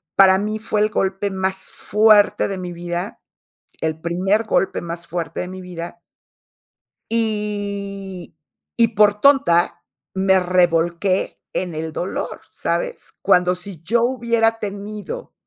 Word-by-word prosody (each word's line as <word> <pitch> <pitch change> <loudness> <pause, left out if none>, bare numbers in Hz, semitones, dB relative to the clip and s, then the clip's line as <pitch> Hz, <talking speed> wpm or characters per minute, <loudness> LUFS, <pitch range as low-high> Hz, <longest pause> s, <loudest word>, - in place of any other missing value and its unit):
para 190 -1 +7
mí 215 +2 -2
fue 215 -1 0
el 215 - +3
golpe 195 0 -1
más 190 0 -2
fuerte 210 0 +4
de 195 - -4
mi 180 -1 -5
vida, 175 +3 -4 0.6
el 160 0 -1
primer 185 +6 +1
golpe 195 - +1
más 170 0 -6
fuerte 165 -2 -3
de 180 - -4
mi 185 0 -8
vida. 175 -1 -8 1.1
Y 200 -5 -3 0.4
y 230 -1 +5
por 210 -1 +3
tonta 270 -12 +4 0.3
me 190 0 +4
revolqué 175 +1 +1
en 180 -3 -2
el 160 0 -4
dolor, 180 - -4
¿sabes? - - -3
Cuando 180 0 +4
si 180 -2 -6
yo 230 +7 +2
hubiera 235 -2 +1
tenido, 210 - -6
195 Hz, 130 wpm, -21 LUFS, 175-210 Hz, 1.1 s, para